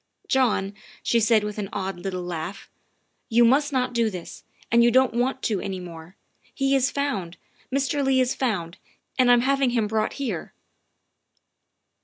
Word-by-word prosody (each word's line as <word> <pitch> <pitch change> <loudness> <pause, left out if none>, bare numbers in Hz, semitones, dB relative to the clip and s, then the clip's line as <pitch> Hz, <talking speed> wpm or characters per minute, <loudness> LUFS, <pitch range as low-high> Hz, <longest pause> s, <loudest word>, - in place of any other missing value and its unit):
" - - -36
John," 210 -6 +1 0.3
she 235 - +2
said 220 -1 +3
with 210 0 -4
an 200 -2 -4
odd 195 -2 -4
little 185 -1 -4
laugh, 175 +2 -6 0.3
" - - -48
you 240 - +7
must 285 +5 +3
not 250 -2 0
do 230 -2 +2
this, 180 -4 -9 0.3
and 235 +1 +5
you 240 - +5
won't 260 0 +4
want 255 +3 -1
to 210 -4 0
any 190 -1 -4
more. 170 0 -10 0.4
He 275 0 +2
is 270 0 +2
found 205 -12 -3 0.3
Mr. 275 +1 0
Leigh 265 -1 +3
is 255 0 +2
found, 190 -10 -2 0.4
and 250 -1 +5
I'm 245 -1 +6
having 275 0 +2
him 235 -3 +1
brought 215 +1 -1
here." 230 - -4
235 Hz, 175 wpm, -24 LUFS, 195-260 Hz, 0.4 s, you